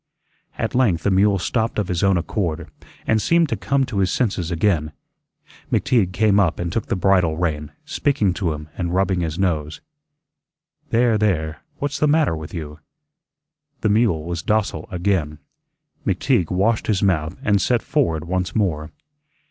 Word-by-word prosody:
At - - -2
length 110 -10 +2
the 100 - +2
mule 100 +1 +4
stopped 110 +5 -1
of 105 -3 0
his 90 -2 -1
own 95 -2 +3
accord, 85 -2 -2 0.4
and 110 -1 +2
seemed 170 +7 +3
to - - 0
come 140 -1 0
to 110 -5 -3
his 95 -2 +2
senses 95 -6 -1
again. 80 -4 0 0.8
McTeague 105 -8 +2
came 100 +1 +3
up 90 -5 +2
and 85 0 -3
took 115 - -2
the - - 0
bridle 90 -4 +2
rein, 75 -3 -2
speaking 110 -10 +1
to 85 -2 -1
him 75 0 -6
and 90 -1 -2
rubbing 95 -1 +1
his 80 -2 -2
nose. 80 -5 -1 1.1
"There, 115 -2 +3
there, 80 -7 0 0.2
what's 145 0 -3
the 150 - +3
matter 150 - +3
with 80 -1 -8
you?" 75 -3 -7 1.0
The 110 - +2
mule 105 -7 +2
was 85 0 -4
docile 105 -6 -1
again. 85 -5 -1 0.7
McTeague 85 - +1
washed 105 +5 +1
his 105 -3 +1
mouth 85 -3 +1
and 100 -1 +2
set 120 +2 +1
forward 85 - 0
once 90 0 -2
more. 80 -7 0
95 Hz, 165 wpm, -21 LUFS, 80-110 Hz, 1.1 s, mule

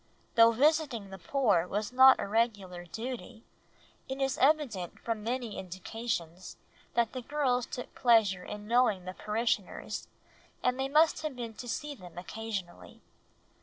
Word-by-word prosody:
Though 230 0 +7
visiting 265 -5 +1
the 190 - -8
poor 205 -7 +2
was 210 +4 -3
not 260 +1 +8
a - - -2
regular 200 -5 -1
duty, 230 +4 -7 0.7
it 265 +1 -4
is 270 -1 0
evident 265 - +1
from 225 -2 -3
many 235 -1 -3
indications 185 -1 -5 0.4
that 235 -2 +2
the 255 - -4
girls 250 -3 0
took 245 - -7
pleasure 215 -7 +3
in 210 +1 -8
knowing 225 -6 +3
the 185 - -5
parishioners, 210 -1 -2 0.6
and 250 +1 +1
they 265 0 -1
must 310 +3 +4
have 305 -4 -4
been 235 -2 -6
to 245 +2 -8
see 295 +5 -3
them 180 -9 -13
occasionally. 195 -1 -6
230 Hz, 145 wpm, -30 LUFS, 195-255 Hz, 0.7 s, not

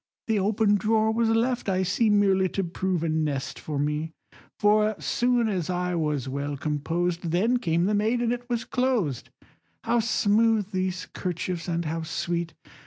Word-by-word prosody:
The 220 -2 +1
open 205 +1 +2
drawer 220 +2 +2
was 225 0 +1
left, 230 0 +1
I 190 0 +1
see, 215 +5 +2
Merely 195 -2 +3
to 195 - +2
prove 180 0 -2
a 165 - 0
nest 150 -4 -2
for 150 -2 -4
me, 150 +3 -1 0.4
For 210 +1 +3
soon 245 -1 +1
as 185 -6 -2
I 180 0 -1
was 150 -5 -1
well 140 +2 -3
composed, 165 +4 -2
Then 215 +9 +2
came 170 -6 +1
the 210 - +1
maid, 220 +4 +1
and 240 0 +1
it 245 +1 -7
was 235 -2 -1
closed, 240 - -1 0.5
How 240 - +2
smooth 220 -1 +2
these 185 -1 -2
'kerchiefs, 175 -1 -3
and 170 -1 -1
how 165 +1 -2
sweet! 170 +1 -3
190 Hz, 170 wpm, -26 LUFS, 165-220 Hz, 0.5 s, Merely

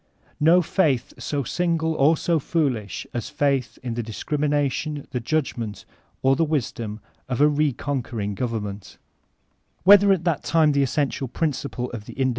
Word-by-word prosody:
No 170 +4 +5
faith 155 -8 +1
so 145 -2 -2
sinq>le 165 +1 0
or 155 +3 +4
so 170 +1 +1
foolish 135 - -1
as 120 - -3
faith 140 -4 0
in 120 -2 -3
the 120 - -2
discrimination, 145 +4 -1
the 125 - -1
judgement, 115 - -2 0.4
or 135 0 +4
the 165 - +2
wisdom 120 -8 -2 0.3
of 125 - -2
a 145 - +6
re 150 0 +2
conquering 120 -6 -3
government 105 -3 -4 0.9
Whether 200 +1 +8
at 185 -4 +2
that 170 -4 0
time 160 -2 +3
the 140 -1 +2
essential 135 0 0
principle 135 -3 -3
of 110 -3 -7
the - - -9
inde 130 -1 +3
140 Hz, 155 wpm, -24 LUFS, 120-155 Hz, 0.9 s, Whether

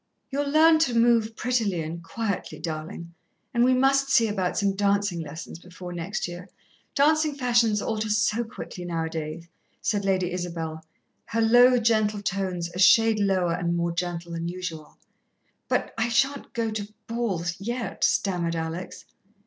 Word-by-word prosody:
"You'll 285 +1 -1
learn 315 +2 +6
to 250 -7 +2
move 230 -1 +3
prettily 220 -9 0
and 165 +2 -6
quietly, 205 +2 -3
darling, 170 +1 -6 0.4
and 235 - +3
we 255 +1 +4
must 275 +1 +3
see 230 -4 +4
about 190 -4 -1
some 200 -2 +1
dancin' 200 -2 +1
lessons 160 +1 -7
before 180 0 -9
next 175 +5 -3
year. 175 +2 -9 0.5
Dancin' 310 +1 +3
fashions 240 -5 +2
alter 220 0 -2
so 210 +2 +2
quickly 220 -5 -8
now 165 -2 -2
a - - -4
days," 160 +1 -5 0.3
said 205 -2 -1
Lady 185 -2 +1
Isabel, 165 -3 -4 0.4
her 230 - -1
low, 245 +3 +6
gentle 215 -3 +1
tones 185 -3 -2
a 180 - -6
shade 220 +4 +6
lower 190 -4 +2
and 170 0 -1
more 170 0 0
gentle 170 0 -4
than 165 0 -3
usual. 170 -3 -6 0.7
"But - - -1
I 230 +2 +1
shan't 275 +4 0
go 230 -1 -1
to 210 -1 -5 0.2
balls 195 -7 -2
yet," 235 +4 -4
stammered 175 -4 +1
Alex. 165 +2 -5
200 Hz, 155 wpm, -26 LUFS, 170-230 Hz, 0.7 s, learn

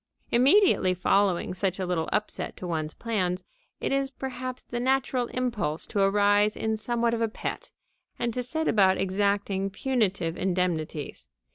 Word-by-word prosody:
Immediately 260 - +4
following 185 0 +2
such 190 0 -1
a 190 - -2
little 175 -3 -1
upset 210 - -2
to - - -7
one's 155 -3 -3
plans, 185 -6 -1 0.4
it - - -2
is 275 0 +1
perhaps 255 -1 -5
the 240 - -4
natural 260 -1 +1
impulse 235 -12 -2
to 205 - -3
arise 205 +1 +3
in 220 0 0
somewhat 235 +1 0
of 230 - -1
a 230 - +3
pet - - -5 0.5
and 235 -1 -1
to 250 - -2
set 315 +6 -2
about 190 -3 +4
exacting 195 0 0
punitive 195 -7 -1
indemnities. 165 - -2
205 Hz, 150 wpm, -27 LUFS, 185-240 Hz, 0.5 s, Immediately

